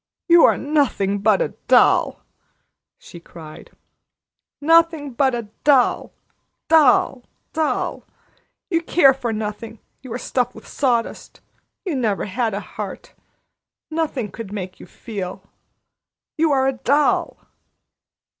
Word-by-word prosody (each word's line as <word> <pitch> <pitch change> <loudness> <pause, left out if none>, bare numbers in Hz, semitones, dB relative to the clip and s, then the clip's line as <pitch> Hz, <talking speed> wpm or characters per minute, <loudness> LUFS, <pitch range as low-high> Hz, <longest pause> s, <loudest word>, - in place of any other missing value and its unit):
"You 340 -2 +7
are - - +3
nothing 270 -9 0
but 220 - +3
a - - -3 0.2
doll!" - - +3 0.7
she 170 - -13
cried. 160 -2 -13 0.9
"Nothing 325 -2 +3
but 260 0 +1
a 235 - -4 0.2
doll 270 -4 +3 0.6
doll 280 -4 +4 0.3
doll! 315 -1 -2 0.7
You 335 -1 +1
care 325 -5 +4
for 250 -3 -4
nothing. 220 +1 -5 0.2
You 255 -2 -11
are - - -3
stuffed 250 -1 -2
with - - -13
sawdust. 245 -5 -2 0.5
You 360 - -2
never 220 -6 -1
had 220 +1 -2
a - - -2
heart. - - -8 0.8
Nothing 295 - -2
could 225 +2 -8
ever 200 - -8
make 185 -2 -7
you - - -12
feel. 190 -3 -7 0.9
You 320 0 +1
are 265 -1 +2
a 270 - +1
doll!" 280 +4 +1
250 Hz, 125 wpm, -21 LUFS, 215-295 Hz, 0.9 s, You